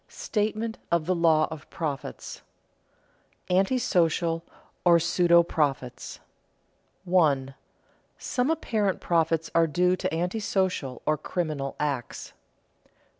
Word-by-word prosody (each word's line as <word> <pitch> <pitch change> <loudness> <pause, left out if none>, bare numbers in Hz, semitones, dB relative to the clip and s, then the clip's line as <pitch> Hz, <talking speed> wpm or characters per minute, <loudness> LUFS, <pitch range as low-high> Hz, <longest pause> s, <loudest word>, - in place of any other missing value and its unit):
STATEMENT 220 +1 -2
OF 170 -2 +2
THE 185 - +1
LAW 165 -3 +3
OF 155 -1 -9
PROFITS 150 -5 -5 1.1
[Sidenote: 180 +1 +3
Antisocial 175 -7 +1 0.4
or 175 -1 +6
pseudo 170 0 +4
profits] 140 -7 -2 0.9
1. 145 -7 +2 0.7
_Some 255 +3 0
apparent 215 - 0
profits 165 -1 0
are 165 0 +4
due 180 +3 +2
to - - -2
antisocial 180 - -1
or 155 -1 +1
criminal 155 -5 -3
acts. 140 -5 -3
170 Hz, 100 wpm, -26 LUFS, 155-185 Hz, 1.1 s, or